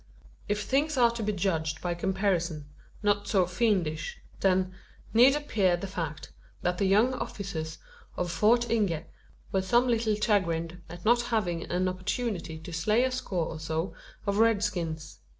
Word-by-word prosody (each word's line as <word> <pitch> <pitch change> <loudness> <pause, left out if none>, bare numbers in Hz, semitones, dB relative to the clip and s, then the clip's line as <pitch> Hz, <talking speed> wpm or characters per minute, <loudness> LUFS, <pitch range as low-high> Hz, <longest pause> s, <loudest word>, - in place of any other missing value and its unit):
If 210 0 0
things 290 +4 +1
are 240 -2 +5
to 235 0 -5
be 210 0 0
judged 165 -5 -1
by 175 -1 -1
comparison, 175 -4 0 0.4
not 205 0 +2
so 190 -4 +3
fiendish, 175 -5 0 0.2
then, 185 -1 +2 0.4
need 250 +5 +7
appear 205 -12 +1
the 175 - -5
fact, 165 -6 -5 0.3
that 180 0 0
the 200 - +2
young 215 +7 +4
officers 195 -11 -4 0.4
of 175 -1 -1
Fort 230 +7 +3
Inge 200 -9 +1 0.5
were 190 - +2
some 240 +6 +3
little 225 -3 +2
chagrined 175 -5 0
at 175 +1 -10
not 240 +2 +5
having 210 -9 -1
an 180 +1 0
opportunity 185 -2 -2
to 165 +2 -9
slay 210 +9 +2
a 260 - +1
score 190 -9 -2
or 155 - -6
so 160 +3 -2 0.3
of 200 0 0
red 225 -2 +4
skins. 165 -6 -3
195 Hz, 160 wpm, -28 LUFS, 170-225 Hz, 0.5 s, need